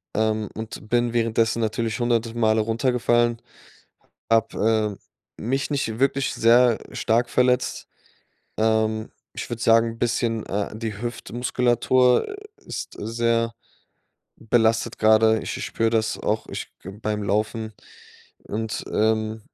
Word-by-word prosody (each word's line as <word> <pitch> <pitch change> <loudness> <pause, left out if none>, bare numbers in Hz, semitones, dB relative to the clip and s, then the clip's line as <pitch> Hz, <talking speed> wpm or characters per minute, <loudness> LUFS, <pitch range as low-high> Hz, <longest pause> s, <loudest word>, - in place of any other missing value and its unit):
Ähm, 110 -1 0
und 110 -1 -7
bin 120 -1 +2
währenddessen 115 0 +1
natürlich 115 +1 -1
100 115 -1 0
Male 110 -1 +3
runtergefallen, 120 0 +1 0.9
habe, 110 -2 +1 0.4
ähm, - - -7
mich 135 +3 -1
nicht 115 -5 -2
wirklich 135 0 +1
sehr 120 0 +5 0.2
stark 120 +1 +1
verletzt. 125 0 +1 0.7
Ähm, 110 0 +1 0.2
ich - - -6
würd 120 -1 -4
sagen, 115 0 +3
bisschen 115 -1 0
äh, 100 +1 -2
die 110 -2 -5
Hüftmuskulatur 125 - +1 0.3
ist - - -6
sehr 115 +1 0 0.9
belastet 115 0 +1
grade. 110 0 +4
Ich - - -4
ich - - -4
spüre 115 0 0
das 110 -1 0
auch, 110 +1 -1
ich - - -5
g 95 - -9
beim 105 -1 -2
Laufen. 110 +2 -1 0.7
Und, 110 +1 -4
ähm 110 0 +1
115 Hz, 120 wpm, -23 LUFS, 110-120 Hz, 0.9 s, sehr